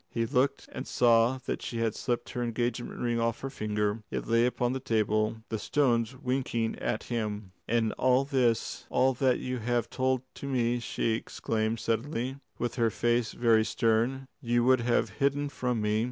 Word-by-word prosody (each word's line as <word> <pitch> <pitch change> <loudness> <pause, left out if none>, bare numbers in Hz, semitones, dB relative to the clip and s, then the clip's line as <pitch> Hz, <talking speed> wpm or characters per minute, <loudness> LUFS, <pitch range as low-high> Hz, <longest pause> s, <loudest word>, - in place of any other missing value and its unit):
He 115 -1 -1
looked 135 +2 +1
and - - -6
saw 120 +1 +4
that - - -2
she 120 - -4
had 115 -2 +1
slipped 120 0 -2
her 125 - -3
engagement 120 0 -2
ring 120 -1 0
off 115 0 0
her 135 - -4
finger. 105 -2 -1
It - - -3
lay 115 +1 +3
upon 125 0 0
the 130 - -2
table, 110 -3 0
the 110 - -2
stones 120 -4 +1
winking 125 -4 -1
at 110 - -2
him. 105 -4 -3 0.2
"And 115 -1 +2
all 130 +1 +4
this 125 -5 0
all 130 +1 +3
that 130 0 +2
you 125 -1 -3
have 120 0 -1
told 130 -1 0
to 140 - -6
me," 120 -2 +1
she 115 -1 -1
exclaimed 110 0 -1
suddenly, 120 +4 -2 0.2
with 120 0 -3
her 115 -2 +3
face 120 +1 0
very 115 -2 +4
stern, 120 +4 +1
"you 120 -2 +2
would 130 +1 +5
have 120 0 +1
hidden 140 +1 +1
from 125 -5 -1
me? 105 +1 +1
120 Hz, 180 wpm, -29 LUFS, 115-130 Hz, 0.2 s, would